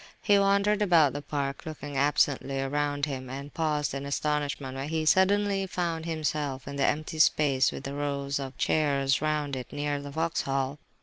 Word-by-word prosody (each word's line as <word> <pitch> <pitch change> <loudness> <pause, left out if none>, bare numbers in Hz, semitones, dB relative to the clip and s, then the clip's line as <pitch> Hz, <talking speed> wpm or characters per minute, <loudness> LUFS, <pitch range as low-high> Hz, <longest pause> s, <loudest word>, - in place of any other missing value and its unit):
He 205 -2 +5
wandered 200 +1 +3
about 170 -8 +4
the 145 - -4
park, 140 -2 -3
looking 150 -3 -7
absently 140 -1 +1
around 145 +1 0
him, 130 -3 -5
and 140 +2 -7
paused 150 -2 0
in 140 0 -4
astonishment 145 -2 -2
when 135 +2 -4
he 160 -1 -1
suddenly 195 +2 +3
found 170 -3 -2
himself 150 -4 -2
in 140 - -5
the 140 - +2
empty 155 +1 -2
space 140 -4 +4
with - - -7
the 140 - -5
rows 140 -1 -2
of 135 -1 -6
chairs 140 -3 +1
round 150 -2 -1
it, 130 -1 -7
near 145 0 -2
the 145 - -7
Vauxhall. 140 -3 -1
145 Hz, 175 wpm, -28 LUFS, 140-160 Hz, -, He